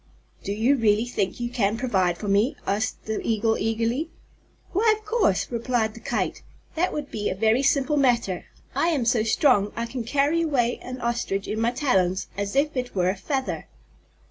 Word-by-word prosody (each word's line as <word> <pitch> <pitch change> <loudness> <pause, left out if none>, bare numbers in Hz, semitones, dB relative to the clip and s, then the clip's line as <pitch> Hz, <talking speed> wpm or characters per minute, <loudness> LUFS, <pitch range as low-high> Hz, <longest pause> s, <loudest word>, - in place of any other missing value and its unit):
"Do 200 - -3
you 230 +7 +2
really 220 -1 +3
think 210 -5 -2
you 240 0 -3
can 215 -2 +1
provide 190 -8 +1
for 210 - -6
me?" 205 +6 +2
asked 210 +3 -2
the 220 -1 -2
Eagle 225 0 +1
eagerly. 230 +8 -1 0.6
"Why, 435 +3 +3
of 435 - -20
course," 425 - +1
replied 235 -2 0
the 230 - -11
Kite. 235 - -2 0.3
"That 350 +3 0
would 295 -2 -5
be 210 -1 -2
a - - -2
very 220 +5 +3
simple 280 +1 +2
matter. 235 -9 +1 0.3
I 330 - +1
am 295 -8 +1
so 230 -1 +3
strong 215 -2 +3
I 230 - -2
can 235 +1 -5
carry 285 +7 +1
away 255 -7 +1
an 255 0 -7
Ostrich 235 -4 -1
in 215 - -2
my 230 +1 +2
talons 190 - +1
as 200 +2 -3
if 290 +2 +2
it 250 -3 -3
were 180 -1 +2
a - - -5
feather!" 265 +6 -3
235 Hz, 190 wpm, -25 LUFS, 210-275 Hz, 0.6 s, really